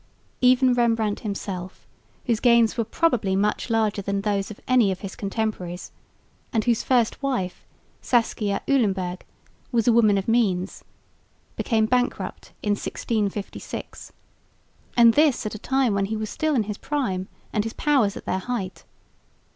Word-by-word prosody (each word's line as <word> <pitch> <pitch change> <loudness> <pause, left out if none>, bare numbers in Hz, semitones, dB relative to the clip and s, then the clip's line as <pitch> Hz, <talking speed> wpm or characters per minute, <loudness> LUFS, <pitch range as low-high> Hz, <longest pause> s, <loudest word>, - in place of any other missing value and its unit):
Even 255 0 +5
Rembrandt 225 -3 +1
himself, 195 -3 -5 0.4
whose 230 -4 +1
gains 235 -2 +4
were 230 - 0
probably 225 -6 +1
much 210 +5 0
larger 220 -3 +1
than 200 0 -2
those 200 -1 -1
of 215 - -9
any 245 -6 +4
of 185 - -5
his 195 -1 -6
contemporaries, 195 -4 -3 0.6
and 220 -3 +1
whose 235 -2 +2
first 245 -2 +1
wife, 250 -10 -2 0.4
Saskia 215 -4 0
Uilenburg, 190 -9 +1 0.5
was 235 -2 +1
a 240 - +6
woman 215 -3 +5
of 195 - -2
means, 205 -5 +1 0.7
became 220 -3 +1
bankrupt 245 +2 -1
in 210 - +1
1656, 205 -1 -4 0.9
and 235 -1 +7
this 295 -5 +3
at 215 - -3
a 215 - -6
time 265 -2 +1
when 200 0 +1
he 220 +2 -3
was 215 -1 -4
still 310 -2 0
in 230 - +2
his 210 0 -6
prime, 235 -11 -2 0.3
and 210 - +1
his 225 +1 -5
powers 265 -9 +2
at - - -10
their 185 - -1
height. 195 -3 -4
220 Hz, 150 wpm, -24 LUFS, 200-245 Hz, 0.9 s, and